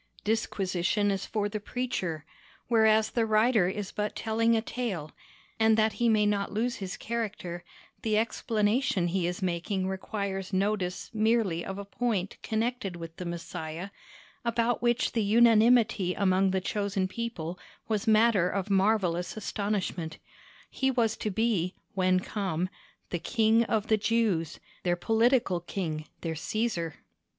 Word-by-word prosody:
Disquisition 205 -2 0
is 195 -1 -2
for 210 -2 -1
the 210 +1 -4
preacher; 200 -10 -3 0.4
whereas 220 -1 +4
the 235 - +1
writer 215 -2 +3
is 195 +1 -4
but 210 0 -3
telling 230 +1 +2
a - - +1
tale, 200 -13 -3 0.5
and 220 0 +5
that 220 -1 +3
he 235 - +4
may 215 -1 +4
not 205 -1 0
lose 235 +4 -1
his 190 -2 -5
character, 210 -7 -4 0.4
the 215 -2 +1
explanation 215 -3 +1
he 180 -1 0
is 180 +2 -3
making 185 +2 -1
requires 195 0 -3
notice 190 -1 -1
merely 215 -6 +2
of 195 - -5
a 200 - -6
point 200 -3 -2
connected 220 -3 -2
with 165 -1 -8
the 180 - -5
Messiah 170 +1 -5 0.5
about 235 0 +1
which 240 0 +2
the 230 - 0
unanimity 220 -3 +4
among 190 -1 +3
the 190 0 0
chosen 200 -1 -1
people 185 -6 -5 0.3
was 220 0 -1
matter 215 -4 +4
of 195 +1 -2
marvellous 190 -3 +1
astonishment: 200 -6 -2 0.5
he 265 - +1
was 235 -4 +1
to 215 - -3
be, 205 -4 0 0.2
when 185 -1 +3
come, 185 -3 -2 0.4
the 175 - -1
KING 225 +5 +3
OF 220 -2 0
THE 220 -1 +3
JEWS—their 195 -5 -1
political 225 0 +2
King, 160 -3 -4
their 165 -1 -2
Caesar. 170 -1 -2
205 Hz, 140 wpm, -29 LUFS, 185-225 Hz, 0.5 s, and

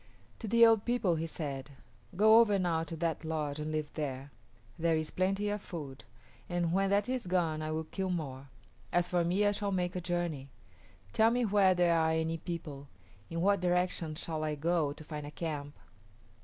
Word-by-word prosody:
To 225 - -5
the 230 +2 +6
old 225 -2 +5
people 240 -7 +1
he 165 +1 -2
said, 140 -3 -5 0.4
"Go 220 +4 +7
over 210 -3 +4
now 170 -3 0
to 165 - -6
that 165 0 -2
lodge 155 -2 -2
and 155 +1 -3
live 155 -1 -3
there. 140 -2 -4 0.5
There 165 -1 +2
is 155 -1 -3
plenty 195 +3 0
of 205 0 -2
food, 140 - -8 0.4
and 175 -1 0
when 195 +1 +2
that 200 +1 +2
is 255 -5 -2
gone 170 -4 0
I 155 - -3
will 160 +1 -2
kill 190 +4 -4
more. 140 -6 -4 0.4
As 175 0 +2
for 175 -1 +1
me, 185 +5 +2
I 205 - +4
shall 205 0 -2
make 180 -1 -1
a 180 - -2
journey. 170 -6 -2 0.6
Tell 220 +1 +5
me 245 +1 +1
where 195 -3 +4
there 175 -1 +3
are 160 -1 +3
any 160 0 -1
people. 155 -5 -6 0.4
In 165 0 -3
what 200 +1 +3
direction 180 -3 0
shall 155 -1 -4
I 155 -1 -1
go 160 0 +1
to 155 - -9
find 150 -1 -6
a - - -6
camp?" 150 -2 -5
170 Hz, 195 wpm, -32 LUFS, 155-190 Hz, 0.6 s, Go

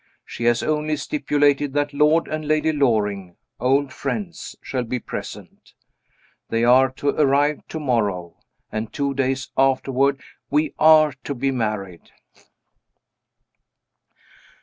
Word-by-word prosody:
She 115 - -6
has 120 0 +2
only 155 0 0
stipulated 145 - +1
that 145 0 -1
Lord 150 +3 +3
and 155 -1 -4
Lady 155 +1 +2
Loring 105 - 0 0.2
(old 135 +2 +1
friends) 195 -6 -5
shall 130 -2 -3
be 125 +2 -3
present. 120 - -9 0.8
They 115 0 0
are 130 +2 +5
to 140 +2 -2
arrive 145 +1 +2
tomorrow, 110 - -2 0.3
and 110 0 -4
two 140 -2 -2
days 135 0 -2
afterward 135 +1 +2 0.3
we 150 +2 +1
are 155 -2 +6
to 140 - -3
be 135 +2 0
married. 105 -8 -4
135 Hz, 115 wpm, -22 LUFS, 120-150 Hz, 0.8 s, are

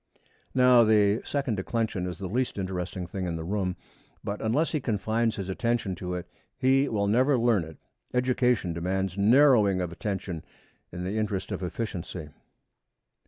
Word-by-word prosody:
Now, 125 -2 +6
the 105 -1 +4
second 135 -7 -1
declension 105 -2 -2
is 90 - -5
the 100 - -6
least 120 +6 -1
interesting 95 -1 -3
thing 90 +1 -4
in 85 - -2
the 80 - -4
room, 95 0 -1 0.5
but 100 +1 -4
unless 125 +9 +1
he 155 - 0
confines 115 -1 0
his 95 -2 -5
attention 115 0 -1
to 90 -1 -4
it 90 - -5 0.3
he 135 +2 +3
will 100 -2 0
never 130 +7 +3
learn 115 -6 +3
it. 80 -1 -11 0.3
Education 125 -7 +1
demands 95 +3 -2
narrowing 105 -2 +5
of 90 -2 -2
attention 95 -3 -4 0.5
in 90 +1 -5
the 100 +4 -2
interest 100 -3 -2
of - - -3
efficiency. 90 -4 -5
100 Hz, 160 wpm, -27 LUFS, 90-120 Hz, 0.5 s, Now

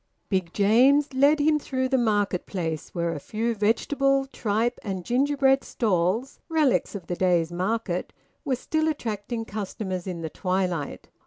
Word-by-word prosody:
Big 185 -4 0
James 260 +9 +4
led 285 +3 +4
him 300 +1 +3
through 260 -2 -1
the 265 - +1
market 205 -6 +1
place, 165 -5 -3
where 170 -1 -2
a 150 - -5
few 225 +9 -2
vegetable, 270 +6 +1
tripe, 230 -2 -1
and 190 -4 -4
gingerbread 270 +1 +2
stalls 210 +3 0
relics 310 -9 +2
of 190 - -6
the 175 - -3
day's 175 -2 +2
market 185 0 -2 0.3
were 275 -5 0
still 315 +5 -1
attracting 225 -5 -3
customers 195 -3 -4
in 175 -3 -4
the 160 - -4
twilight. 180 -5 -2
220 Hz, 150 wpm, -25 LUFS, 185-270 Hz, 0.3 s, James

